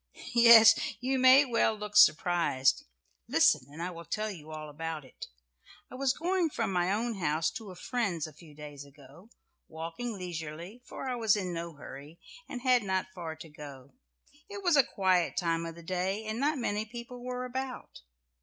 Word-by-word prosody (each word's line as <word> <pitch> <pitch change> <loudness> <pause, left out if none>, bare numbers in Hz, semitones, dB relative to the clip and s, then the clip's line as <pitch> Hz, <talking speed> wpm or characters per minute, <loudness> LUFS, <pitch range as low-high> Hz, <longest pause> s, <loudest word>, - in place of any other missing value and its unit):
Yes, 230 -2 +9 0.3
you 260 +1 -1
may 260 +2 +7
well 230 -3 +1
look 210 0 -8
surprised. 165 -6 +4 0.4
Listen 125 +3 +3
and 160 +3 -7
I 180 - -3
will 170 -1 -9
tell 215 +5 -3
you 160 -5 -11
all 155 -1 -7
about 155 0 -6
it. 130 - -11 0.6
I - - -11
was 270 0 +1
going 355 0 0
from 195 - -2
my 180 +1 +1
own 225 0 -2
house 155 -1 0
to 220 -3 -8
a 185 - -10
friend's 185 - -2
a 155 - -10
few 155 0 -16
days 145 -1 -9
ago, 140 - -17 0.4
walking 165 +9 -6
leisurely, 175 +4 -7
for - - -7
I 255 - -1
was 225 -3 +2
in 185 -3 -3
no 170 0 -5
hurry, 145 +3 -11 0.3
and 250 -3 -6
had 255 -2 +4
not 190 -1 -2
far 165 -4 -6
to 160 0 -12
go. 140 -3 -12 0.6
It 405 -1 -7
was 350 -4 +4
a 280 - +7
quiet 185 -5 +1
time 165 -2 0
of 165 - -8
the 170 - -12
day, 185 +4 -2
and 215 +2 -4
not 295 +2 +1
many 210 -4 -1
people 240 +2 -9
were 250 0 -4
about. 260 - -6
185 Hz, 185 wpm, -30 LUFS, 160-240 Hz, 0.6 s, Yes